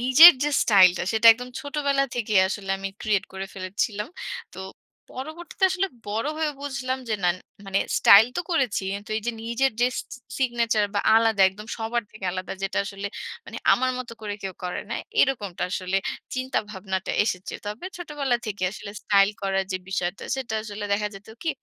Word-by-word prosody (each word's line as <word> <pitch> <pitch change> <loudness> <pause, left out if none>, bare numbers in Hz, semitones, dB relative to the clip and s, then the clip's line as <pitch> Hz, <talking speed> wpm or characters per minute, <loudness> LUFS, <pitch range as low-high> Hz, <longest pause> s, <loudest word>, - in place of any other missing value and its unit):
নিজের 265 +8 +10
যে 295 - +1
স্টাইল 190 -4 +7
টা - - -1
সেটা 220 +1 +3
একদম 250 +2 -8
ছোটবেলা 280 -1 0
থেকেই 215 -5 +2
আসলে 195 -1 -4
আমি 195 - -3
ক্রিয়েট 200 -2 +1
করে 190 0 -5
ফেলেছিলাম। 200 +3 -2 0.4
তো - - -11 0.5
পরবর্তীতে 315 +7 -4
আসলে 380 +1 0 0.2
বড় 225 +6 -1
হয়ে 315 -1 +1
বুঝলাম 265 -2 -3
যে 215 - +1
না, - - +5 0.4
মানে 195 0 +1 0.2
স্টাইল 210 +3 +8
তো - - +1
করেছি। 265 - +1
এন 205 - -8
তো - - -12
এই 220 - -3
যে 240 - 0
নিজের 235 +4 +1
যে, 245 - +5
সি - - -2 0.4
সিগনেচার 235 -4 +1
বা 205 - +2
আলাদা 225 -3 +3
একদম 210 +3 -11
সবার 230 +1 -1
থেকে 215 -3 -10
আলাদা 185 0 -4
যেটা 195 - -1
আসলে 200 0 -5 0.4
মানে - - -8 0.2
আমার 255 +1 +2
মতো 235 -2 -6
করে 205 -1 -4
কেউ 190 -2 -5
করে 180 - -3
না। - - -1 0.3
এরকমটা 210 -9 0
আসলে 185 -1 -1 0.4
চিন্তাভাবনাটা 210 -7 -3
এসেছে। 185 -4 -3
তবে 210 - -5
ছোটবেলা 295 -7 -1
থেকেই 195 -3 -2
আসলে 205 - -8
স্টাইল 200 0 +4
করার 195 0 0
যে 185 - 0
বিষয়টা, 185 -1 -2
সেটা 235 -4 -4
আসলে 210 -1 -6
দেখা 210 +1 +1
যেত 195 +2 -12
কি? 330 - -2
215 Hz, 180 wpm, -25 LUFS, 195-255 Hz, 0.5 s, নিজের